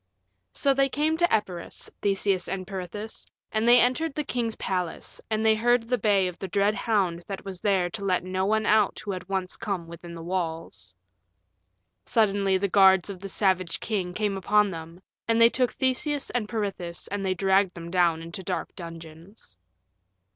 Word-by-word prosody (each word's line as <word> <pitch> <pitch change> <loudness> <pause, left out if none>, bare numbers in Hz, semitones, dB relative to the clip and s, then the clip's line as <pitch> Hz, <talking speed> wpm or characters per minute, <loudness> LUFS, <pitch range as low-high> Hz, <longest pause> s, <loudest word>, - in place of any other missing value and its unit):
So 275 - +3
they 270 0 +2
came 300 +4 +1
to 345 +1 +2
Epirus, 190 -6 -2
Theseus 195 -2 +1
and 185 0 -3
Peirithous, 195 +3 -6 0.2
and 220 +1 0
they 245 +1 +8
entered 265 +6 +1
the 300 - -1
king's 235 -5 -2
palace, 180 -3 -3
and 220 0 0
they 220 - +6
heard 240 +2 +2
the 250 +1 +1
bay 200 -2 +3
of 175 -1 -7
the 190 - -4
dread 200 +3 +2
hound 195 -7 0
that 195 -1 -6
was 190 -2 -7
there 195 -3 +2
to 210 -2 -6
let 185 -3 +1
no 185 +1 -2
one 220 +1 +1
out 210 -1 +3
who 205 - -5
had 185 -1 -6
once 190 -2 -2
come 195 -6 -3
within 170 +1 -10
the 165 - -8
walls. 165 - -4 1.1
Suddenly 200 -3 +2
the 200 +2 0
guards 190 0 +5
of 190 - -9
the 195 +1 -7
savage 185 -3 +1
king 195 -5 -2
came 205 -1 -1
upon 205 +1 +3
them, 165 +2 -9 0.2
and 230 0 +2
they 230 0 +8
took 250 -2 +1
Theseus 275 +2 0
and 220 -4 -2
Peirithous 195 -6 -4
and 200 0 -3
they 190 -1 0
dragged 190 -1 +2
them 170 -1 -8
down 170 -3 +2
into 170 +4 -7
dark 180 -2 -4
dungeons. 165 - -11
195 Hz, 185 wpm, -26 LUFS, 180-220 Hz, 1.1 s, they